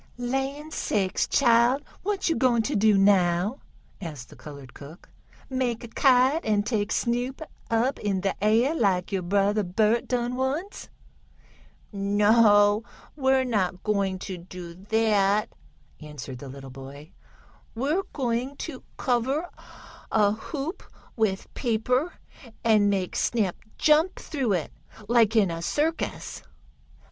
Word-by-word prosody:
"Land 270 Hz, +5 st, -3 dB
sakes, 195 Hz, -1 st, 0 dB
chile! 240 Hz, 0 st, +4 dB, 0.2 s
what 405 Hz, 0 st, -1 dB
yo' 330 Hz, -, +2 dB
gwine 240 Hz, -3 st, +2 dB
t' -, -, -2 dB
do 210 Hz, 0 st, +4 dB
now?" 195 Hz, +3 st, +3 dB, 0.4 s
asked 150 Hz, -9 st, -7 dB
the -, -, -14 dB
colored 140 Hz, -4 st, -11 dB
cook. 150 Hz, +5 st, -13 dB, 0.4 s
"Make 255 Hz, -3 st, -2 dB
a -, -, -7 dB
kite, 265 Hz, +5 st, +3 dB
an' 210 Hz, -2 st, +1 dB
take 215 Hz, -2 st, -1 dB
Snoop 245 Hz, +2 st, -1 dB, 0.3 s
up 235 Hz, +4 st, +1 dB
in 195 Hz, -2 st, -1 dB
de 195 Hz, 0 st, 0 dB
air 230 Hz, +7 st, +3 dB
laik 195 Hz, -, +1 dB
yo' 195 Hz, -2 st, -1 dB
brother 200 Hz, +3 st, +1 dB
Bert 215 Hz, +5 st, +1 dB
done 245 Hz, 0 st, -1 dB
once?" 275 Hz, +10 st, -3 dB, 1.0 s
"No, 205 Hz, +1 st, +4 dB, 0.3 s
we're 265 Hz, -2 st, +2 dB
not 190 Hz, -7 st, -1 dB
going 200 Hz, -3 st, 0 dB
to 185 Hz, -1 st, -6 dB
do 175 Hz, -1 st, -9 dB
that," 210 Hz, +2 st, +1 dB, 0.5 s
answered 145 Hz, -4 st, -8 dB
the 140 Hz, -, -9 dB
little 135 Hz, 0 st, -10 dB
boy. 135 Hz, +4 st, -11 dB, 0.6 s
"We're 285 Hz, +10 st, 0 dB
going 255 Hz, 0 st, -2 dB
to -, -, -7 dB, 0.2 s
cover 265 Hz, +7 st, 0 dB, 0.6 s
a 210 Hz, -2 st, +4 dB
hoop 285 Hz, -, -5 dB, 0.3 s
with 210 Hz, -4 st, -1 dB
paper, 250 Hz, +6 st, 0 dB, 0.5 s
and 215 Hz, -3 st, +4 dB
make 190 Hz, -2 st, -1 dB
Snap 210 Hz, -7 st, 0 dB, 0.2 s
jump 310 Hz, +4 st, +3 dB
through 265 Hz, -9 st, -2 dB
it, 170 Hz, -5 st, -2 dB, 0.3 s
like 230 Hz, -1 st, +3 dB
in 200 Hz, -5 st, +4 dB
a 165 Hz, 0 st, -5 dB
circus." 310 Hz, -, -2 dB
220 Hz, 130 wpm, -26 LUFS, 195-255 Hz, 1.0 s, chile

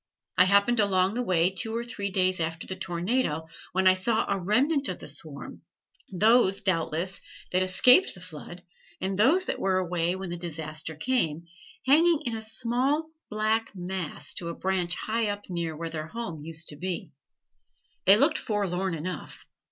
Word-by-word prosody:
I 185 Hz, -, +6 dB
happened 200 Hz, +5 st, +4 dB
along 190 Hz, -2 st, +2 dB
that 245 Hz, -, -1 dB
way 180 Hz, -5 st, +2 dB
two 220 Hz, +4 st, -2 dB
or 235 Hz, -, -1 dB
three 205 Hz, -4 st, -4 dB
days 185 Hz, -1 st, +2 dB
after 165 Hz, 0 st, -2 dB
the 185 Hz, -, -5 dB
tornado, 175 Hz, -1 st, -1 dB, 0.3 s
when 190 Hz, +1 st, 0 dB
I 185 Hz, -, +8 dB
saw 220 Hz, +4 st, +1 dB
a 200 Hz, -1 st, 0 dB
remnant 275 Hz, -, +1 dB
of -, -, -3 dB
the -, -, -10 dB
swarm, -, -, -3 dB, 0.5 s
those, 200 Hz, 0 st, +4 dB
doubtless, 185 Hz, -1 st, -1 dB, 0.3 s
that 185 Hz, -, +2 dB
escaped 250 Hz, -, +5 dB
the -, -, -12 dB
flood 175 Hz, 0 st, -10 dB, 0.4 s
and 190 Hz, +1 st, -2 dB
those 325 Hz, -, +4 dB
that -, -, -2 dB
were 190 Hz, -1 st, +1 dB
away 175 Hz, -1 st, 0 dB
when 190 Hz, -2 st, -6 dB
the 175 Hz, -, -4 dB
disaster 160 Hz, -2 st, -5 dB
came, 170 Hz, -7 st, 0 dB, 0.4 s
hanging 320 Hz, +3 st, +4 dB
in 235 Hz, -2 st, -2 dB
a 220 Hz, -, -5 dB
small 250 Hz, +8 st, 0 dB, 0.2 s
black 215 Hz, 0 st, 0 dB
mass 180 Hz, -2 st, -4 dB
to 170 Hz, -, -4 dB
a 170 Hz, -, -5 dB
branch 185 Hz, -2 st, 0 dB
high 225 Hz, 0 st, -1 dB
up 205 Hz, -1 st, -5 dB
near 165 Hz, -3 st, -3 dB
where 165 Hz, 0 st, -5 dB
their 155 Hz, -1 st, -5 dB
home 180 Hz, -6 st, -6 dB
used 160 Hz, +1 st, -4 dB
to 145 Hz, -, -10 dB
be. 180 Hz, -2 st, -4 dB, 0.9 s
They 195 Hz, +2 st, +8 dB
looked -, -, +4 dB
forlorn 190 Hz, -4 st, -1 dB
enough. 180 Hz, +4 st, -6 dB
190 Hz, 175 wpm, -27 LUFS, 170-220 Hz, 0.9 s, I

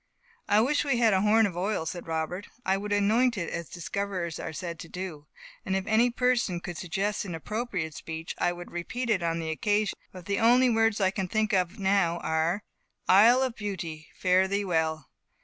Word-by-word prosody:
"I 210 Hz, -, +5 dB
wish 285 Hz, +5 st, +2 dB
we 275 Hz, -4 st, +1 dB
had 230 Hz, -3 st, +4 dB
a 190 Hz, -, +3 dB
horn 220 Hz, +2 st, +4 dB
of 190 Hz, -4 st, -3 dB
oil," 185 Hz, -1 st, -1 dB
said 175 Hz, +1 st, -5 dB
Robert, 165 Hz, +4 st, -3 dB, 0.2 s
"I 190 Hz, -, +3 dB
would 205 Hz, +1 st, -4 dB
anoint 220 Hz, +4 st, +3 dB
it, 170 Hz, -3 st, -3 dB
as 170 Hz, -, -5 dB
discoverers 180 Hz, -1 st, -4 dB
are 160 Hz, -, -5 dB
said 170 Hz, 0 st, -6 dB
to 165 Hz, -, -9 dB
do. 175 Hz, -5 st, -7 dB, 0.4 s
And 190 Hz, -, -1 dB
if 190 Hz, 0 st, -1 dB
any 220 Hz, +3 st, +3 dB
person 240 Hz, -7 st, +1 dB
could 175 Hz, 0 st, -7 dB
suggest 195 Hz, +5 st, -2 dB
an 180 Hz, -5 st, -5 dB
appropriate 195 Hz, -3 st, -3 dB
speech 160 Hz, +1 st, -6 dB
I -, -, +2 dB
would 175 Hz, 0 st, -9 dB
repeat 235 Hz, +8 st, -3 dB
it 190 Hz, -4 st, +2 dB
on 165 Hz, -1 st, 0 dB
the 160 Hz, -1 st, -3 dB
occasion; 210 Hz, +4 st, 0 dB, 0.2 s
but 180 Hz, -2 st, -11 dB
the 200 Hz, 0 st, -1 dB
only 245 Hz, +2 st, +5 dB
words 225 Hz, -1 st, +2 dB
I 190 Hz, -2 st, +3 dB
can 190 Hz, -2 st, -3 dB
think 215 Hz, +2 st, 0 dB
of 180 Hz, -2 st, +1 dB
now 190 Hz, -3 st, +2 dB
are, 160 Hz, +5 st, 0 dB, 0.4 s
'Isle 230 Hz, +7 st, +6 dB
of 255 Hz, -3 st, -2 dB
Beauty, 175 Hz, -7 st, -5 dB
fare 185 Hz, +1 st, +3 dB
thee 200 Hz, +1 st, -1 dB
well! 160 Hz, -5 st, 0 dB
190 Hz, 200 wpm, -28 LUFS, 170-215 Hz, 0.4 s, Isle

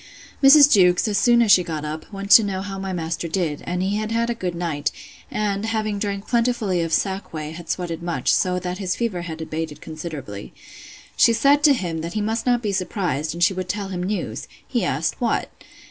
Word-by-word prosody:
Mrs. 285 Hz, +1 st, +8 dB
Jewkes, 180 Hz, 0 st, +4 dB
as 205 Hz, -2 st, +1 dB
soon 235 Hz, +1 st, +5 dB
as 215 Hz, -, +3 dB
she 185 Hz, -, +7 dB
got 155 Hz, -3 st, -4 dB
up, 155 Hz, +5 st, -6 dB
went 200 Hz, 0 st, -6 dB
to 225 Hz, -, +9 dB
know 190 Hz, -2 st, -3 dB
how 195 Hz, -1 st, -6 dB
my 195 Hz, 0 st, -4 dB
master 170 Hz, -1 st, -3 dB
did, 160 Hz, -3 st, -2 dB
and 180 Hz, +1 st, -1 dB
he 200 Hz, +2 st, 0 dB
had 215 Hz, +1 st, -3 dB
had 230 Hz, +1 st, 0 dB
a -, -, 0 dB
good 180 Hz, -6 st, -4 dB
night; 160 Hz, -4 st, -2 dB, 0.4 s
and, 205 Hz, -1 st, -2 dB
having 215 Hz, -2 st, -1 dB
drank 200 Hz, -1 st, -3 dB
plentifully 230 Hz, -6 st, +1 dB
of 165 Hz, -1 st, -2 dB
sack 190 Hz, +3 st, -1 dB
whey, 155 Hz, -1 st, -5 dB
had 170 Hz, +1 st, -10 dB
sweated 170 Hz, -3 st, -3 dB
much; 170 Hz, -1 st, 0 dB
so 180 Hz, -2 st, +1 dB
that 180 Hz, +1 st, -4 dB
his 185 Hz, -2 st, -1 dB
fever 220 Hz, -7 st, -2 dB
had 160 Hz, -2 st, -7 dB
abated 160 Hz, -1 st, -5 dB
considerably. 155 Hz, -11 st, -8 dB, 0.6 s
She 230 Hz, -, +5 dB
said 280 Hz, +5 st, +4 dB
to 290 Hz, -, +7 dB
him, 175 Hz, -9 st, -3 dB
that 170 Hz, +1 st, -5 dB
he 215 Hz, -, -1 dB
must 225 Hz, +3 st, -2 dB
not 245 Hz, -1 st, +2 dB
be 210 Hz, -, 0 dB
surprised, 175 Hz, -, -2 dB
and 175 Hz, -, 0 dB
she 180 Hz, -, +4 dB
would 185 Hz, -1 st, -5 dB
tell 205 Hz, -2 st, -3 dB
him 180 Hz, -2 st, -4 dB
news. 180 Hz, -, -3 dB, 0.2 s
He -, -, -1 dB
asked, -, -, -1 dB
What? -, -, 0 dB
185 Hz, 220 wpm, -22 LUFS, 165-215 Hz, 0.6 s, to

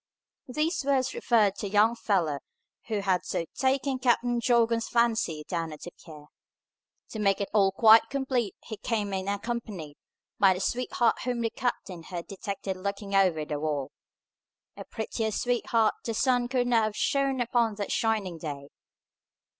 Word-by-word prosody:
These 305 Hz, +5 st, -1 dB
words 265 Hz, -2 st, +1 dB
referred 215 Hz, -5 st, +3 dB
to 205 Hz, -, -3 dB
the 195 Hz, -, -9 dB
young 215 Hz, +3 st, +4 dB
fellow 175 Hz, -11 st, 0 dB, 0.5 s
who 215 Hz, -3 st, -1 dB
had 190 Hz, -2 st, +1 dB
so 165 Hz, -, -2 dB
taken 265 Hz, 0 st, 0 dB
Captain 245 Hz, -1 st, +2 dB
Jorgan's 230 Hz, -1 st, +2 dB
fancy 225 Hz, -10 st, +1 dB
down 165 Hz, -3 st, -3 dB
at 150 Hz, -, -10 dB
the 175 Hz, -, -8 dB
pier. 150 Hz, -4 st, -14 dB, 0.8 s
To 220 Hz, -, -6 dB
make 195 Hz, -2 st, +2 dB
it 200 Hz, -, -3 dB
all 195 Hz, -2 st, +4 dB
quite 220 Hz, +3 st, +6 dB
complete 260 Hz, -6 st, -1 dB
he 220 Hz, -, -7 dB
came 210 Hz, -4 st, -2 dB
in 190 Hz, 0 st, -3 dB
accompanied 200 Hz, -7 st, -4 dB, 0.4 s
by 190 Hz, -2 st, +5 dB
the -, -, -5 dB
sweetheart 240 Hz, +3 st, 0 dB
whom 245 Hz, -1 st, -2 dB
the 225 Hz, -1 st, -1 dB
captain 200 Hz, -8 st, -3 dB
had 170 Hz, 0 st, -7 dB
detected 195 Hz, -1 st, -5 dB
looking 200 Hz, +1 st, -4 dB
over 180 Hz, -6 st, +3 dB
the 150 Hz, -1 st, -3 dB
wall. 145 Hz, -3 st, -2 dB, 0.8 s
A -, -, -9 dB
prettier 220 Hz, 0 st, -3 dB
sweetheart 230 Hz, -1 st, +1 dB
the 230 Hz, -, -3 dB
sun 245 Hz, 0 st, +2 dB
could 250 Hz, -1 st, 0 dB
not 230 Hz, -3 st, +3 dB
have 215 Hz, -1 st, -3 dB
shone 275 Hz, 0 st, +1 dB
upon 235 Hz, -2 st, +1 dB
that 205 Hz, -1 st, -4 dB
shining 210 Hz, -7 st, 0 dB
day. 145 Hz, -3 st, -6 dB
215 Hz, 160 wpm, -28 LUFS, 190-240 Hz, 0.8 s, quite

